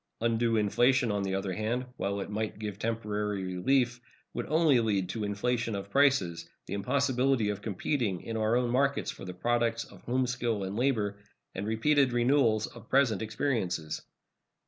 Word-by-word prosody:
Undue 115 0 +1
inflation, 120 +3 +3
on 100 0 0
the 95 -1 -1
other 95 -1 -2
hand, 115 +6 -1
while 100 -4 -2
it - - -5
might 110 0 -3
give 105 -2 -5
temporary 105 -3 -2
relief, 120 +7 +1 0.3
would - - -4
only 155 -5 +4
lead 100 -5 +1
to 110 +2 -4
inflation 115 +2 -1
of 100 0 -6
prices, 135 -12 +2 0.2
the - - -6
impossibility 130 +1 +1
of 100 -1 -3
competing 105 - -1
in 115 - -5
our 110 +1 +2
own 125 -1 +1
markets 140 +2 +1
for - - -10
the 90 - -6
products 115 +2 0
of - - -15
home 130 +1 0
skill 120 -4 -1
and 95 +1 -4
labor, 110 -5 0 0.3
and 100 +2 -4
repeated 130 +4 +3
renewals 120 -3 +3
of 115 -1 -13
present 130 -7 +3
experiences. 105 - -2
115 Hz, 170 wpm, -30 LUFS, 100-125 Hz, 0.3 s, only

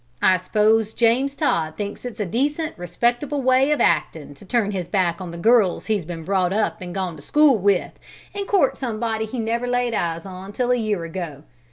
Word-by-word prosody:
I 185 +4 +4
s'pose 215 +4 +1
James 250 +4 +2
Todd 160 - 0
thinks 205 +3 -5
it's 245 -2 -7
a 210 - 0
decent, 290 - -1
respectable 240 - -1
way 260 +2 +4
of 300 - +1
actin', 155 -2 0
to 140 - -16
turn 205 0 0
his 185 -4 -3
back 185 -2 0
on 180 - -6
the 170 - -7
girls 220 -1 +3
he's 210 -6 -1
been 165 -1 -6
brought 185 0 +1
up 215 +2 0
an' 180 -1 -6
gone 185 -3 -3
to - - -12
school 295 - +4
with, 200 -2 +1 0.4
and 400 -1 -4
court 370 -10 +2
somebody 225 -3 -2
he 250 - -6
never 235 +2 -1
laid 245 -1 0
eyes 170 -4 -2
on 190 +1 -9
till 250 +2 0
a - - +4
year 215 -7 -1
ago. 165 -4 -6
215 Hz, 205 wpm, -22 LUFS, 180-245 Hz, 0.4 s, I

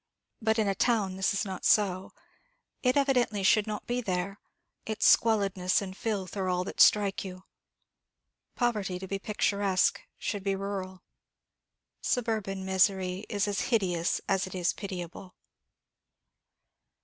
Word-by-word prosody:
But 220 0 +1
in 215 -2 +2
a 195 - +2
town 200 -3 +1
this 190 0 +1
is 200 - -1
not 190 -2 -6
so. 190 -3 +2 0.7
It 255 +1 +2
evidently 250 -7 +2
should 210 +2 +4
not 210 -1 -4
be 245 +1 -1
there 195 -1 -3 0.4
its 220 -1 -2
squalidness 200 -3 +3
and 190 -3 -6
filth 200 -4 -3
are 190 -2 -1
all 180 0 0
that - - -2
strike 205 -2 +4
you. 185 -1 -8 1.1
Poverty, 210 -7 0
to 190 +1 -7
be 195 +1 -3
picturesque, 200 -2 +1 0.2
should 205 -2 -3
be 195 -1 0
rural. 190 -1 -5 1.0
Suburban 215 -5 -1
misery 190 0 +1
is 205 0 0
as 200 -1 -1
hideous 180 -8 +1
as 195 -1 +1
it 185 - -8
is 180 -1 +1
pitiable. 185 -1 -7
195 Hz, 135 wpm, -29 LUFS, 185-215 Hz, 1.1 s, should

